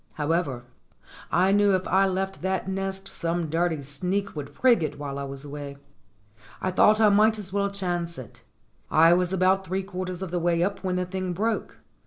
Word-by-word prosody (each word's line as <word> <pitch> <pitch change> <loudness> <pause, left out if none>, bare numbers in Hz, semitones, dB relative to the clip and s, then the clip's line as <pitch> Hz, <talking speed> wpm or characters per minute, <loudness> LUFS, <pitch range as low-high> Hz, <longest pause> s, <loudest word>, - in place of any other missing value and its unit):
However, 150 -5 -1 0.7
I 185 +3 +3
knew 205 -1 +4
if 185 - -2
I 195 +1 +3
left 190 +1 -2
that 190 +1 -1
nest 195 0 -3
some 170 -3 -3
dirty 165 -3 0
sneak 180 +9 -3
would 145 -2 -6
prig 245 -6 +4
it 150 -2 -3
while 140 -1 -5
I - - -3
was 135 +1 -8
away. 140 -1 -7 0.8
I 185 - -1
thought 210 +4 +5
I 215 -1 +6
might 215 +2 +4
as 195 -2 -7
well 200 0 +1
chance 175 -4 -3
it. 125 -5 -11 0.5
I 165 +2 +6
was 180 0 +1
about 190 +1 +2
three 190 +1 -2
quarters 185 -1 -5
of 185 - -6
the 175 - 0
way 170 0 +1
up 200 +2 -2
when 185 -1 -1
the 180 0 0
thing 185 0 -3
broke. 220 +5 -2
185 Hz, 195 wpm, -26 LUFS, 165-195 Hz, 0.8 s, I